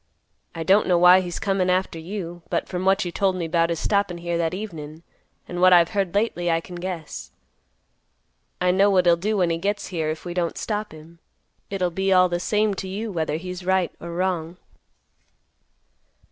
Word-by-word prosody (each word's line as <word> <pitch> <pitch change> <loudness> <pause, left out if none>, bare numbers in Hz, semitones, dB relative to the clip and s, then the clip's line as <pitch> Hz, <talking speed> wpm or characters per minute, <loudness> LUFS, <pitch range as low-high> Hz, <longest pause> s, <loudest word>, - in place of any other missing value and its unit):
I 165 - -3
don't 195 +5 +4
know 180 -2 +4
why 180 +1 +7
he's 175 -2 -5
comin' 195 -2 0
after 180 -2 0
you, 175 0 -6
but, 170 - -1
from 180 0 -4
what 195 0 +3
you 175 - -3
told 190 0 +1
me 170 -2 -3
'bout 165 0 +2
his 165 -2 -2
stoppin' 200 -4 0
here 170 0 -3
that 165 -1 0
evenin', 165 -6 -7 0.4
and 175 0 -4
what 185 0 +7
I've 170 -1 +6
heard 195 -3 -1
lately, 200 -5 0
I 165 0 +2
can 180 - -12
guess. 165 - -6 1.3
I 180 0 +3
know 195 +2 +4
what 185 -2 +3
he'll 170 -1 +6
do 205 +5 -1
when 175 -3 +2
he 165 - -1
gets 200 +3 -2
here, 160 -4 -2
if 155 +2 -5
we 175 - -4
don't 175 -2 -2
stop 210 -1 -3
him. 160 +2 -14 0.5
It'll 185 -3 -1
be 190 +3 -1
all 185 -1 +5
the 175 0 -1
same 210 +3 +1
to 190 - -7
you 210 +4 -4
whether 160 -4 -1
he's 180 +2 -6
right 190 -1 +1
or 170 - -7
wrong." 175 -1 -2
180 Hz, 200 wpm, -23 LUFS, 170-190 Hz, 1.3 s, why